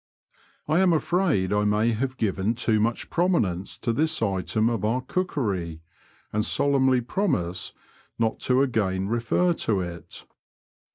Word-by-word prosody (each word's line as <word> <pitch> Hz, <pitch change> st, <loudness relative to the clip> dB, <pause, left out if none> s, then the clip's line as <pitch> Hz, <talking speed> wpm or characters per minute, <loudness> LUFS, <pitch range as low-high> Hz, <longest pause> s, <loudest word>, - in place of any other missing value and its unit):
I 155 Hz, +3 st, +3 dB
am 185 Hz, -2 st, +4 dB
afraid 155 Hz, -, +1 dB
I 105 Hz, 0 st, +2 dB
may 105 Hz, +3 st, +2 dB
have 130 Hz, +3 st, -2 dB
given 105 Hz, +1 st, 0 dB
too 115 Hz, -2 st, +1 dB
much 115 Hz, +2 st, -1 dB
prominence 110 Hz, -, 0 dB
to 115 Hz, -, -1 dB
this 160 Hz, +5 st, +1 dB
item 110 Hz, +1 st, 0 dB
of 115 Hz, -4 st, -1 dB
our 115 Hz, +4 st, +1 dB
cookery, 100 Hz, -, -2 dB, 0.5 s
and 105 Hz, 0 st, +1 dB
solemnly 130 Hz, 0 st, +2 dB
promise 115 Hz, -, -1 dB, 0.5 s
not 115 Hz, -1 st, 0 dB
to 130 Hz, +2 st, +4 dB
again 100 Hz, -7 st, 0 dB
refer 120 Hz, +10 st, +1 dB
to 105 Hz, -, 0 dB
it. 85 Hz, -2 st, -8 dB
115 Hz, 135 wpm, -25 LUFS, 100-140 Hz, 0.5 s, am